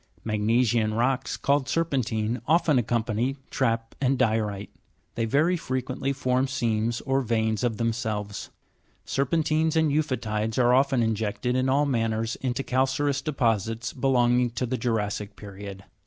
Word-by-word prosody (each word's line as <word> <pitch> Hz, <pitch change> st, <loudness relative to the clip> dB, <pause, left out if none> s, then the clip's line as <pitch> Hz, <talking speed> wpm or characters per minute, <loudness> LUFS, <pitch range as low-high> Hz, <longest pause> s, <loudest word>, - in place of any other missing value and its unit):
Magne 110 Hz, +3 st, +2 dB
sian 110 Hz, -2 st, +1 dB
rocks, 130 Hz, +3 st, 0 dB
called 140 Hz, -1 st, +1 dB
ser'pentine, 125 Hz, -8 st, -1 dB
often 155 Hz, -4 st, +4 dB
accompany 120 Hz, +3 st, -1 dB
trap 115 Hz, -3 st, 0 dB
and 135 Hz, 0 st, +2 dB
di'orite; 110 Hz, -5 st, 0 dB, 0.4 s
they 115 Hz, -, -1 dB
very 155 Hz, +10 st, +2 dB
frequently 130 Hz, -2 st, -2 dB
form 130 Hz, -1 st, 0 dB
seams 115 Hz, -3 st, -1 dB
or 135 Hz, 0 st, +1 dB
veins 110 Hz, -2 st, 0 dB
of 115 Hz, -3 st, 0 dB
themselves. 110 Hz, -3 st, -2 dB, 0.6 s
Ser' 140 Hz, 0 st, 0 dB
pentines 160 Hz, +1 st, +1 dB
and 160 Hz, -2 st, +3 dB
eu'photides 110 Hz, -7 st, -1 dB
are 125 Hz, -1 st, +4 dB
often 130 Hz, -2 st, +3 dB
injected 110 Hz, +2 st, -1 dB
in 130 Hz, +1 st, +1 dB
all 140 Hz, +2 st, +3 dB
manners 115 Hz, -3 st, 0 dB
into 130 Hz, +1 st, -2 dB
cal 130 Hz, +1 st, +2 dB
careous 140 Hz, +1 st, -1 dB
deposits 115 Hz, -5 st, -1 dB
belonging 125 Hz, -2 st, +2 dB
to 120 Hz, +2 st, -3 dB
the 125 Hz, +1 st, -2 dB
jura'ssic 105 Hz, -3 st, -2 dB
period. 100 Hz, -1 st, -9 dB
120 Hz, 140 wpm, -26 LUFS, 110-135 Hz, 0.6 s, often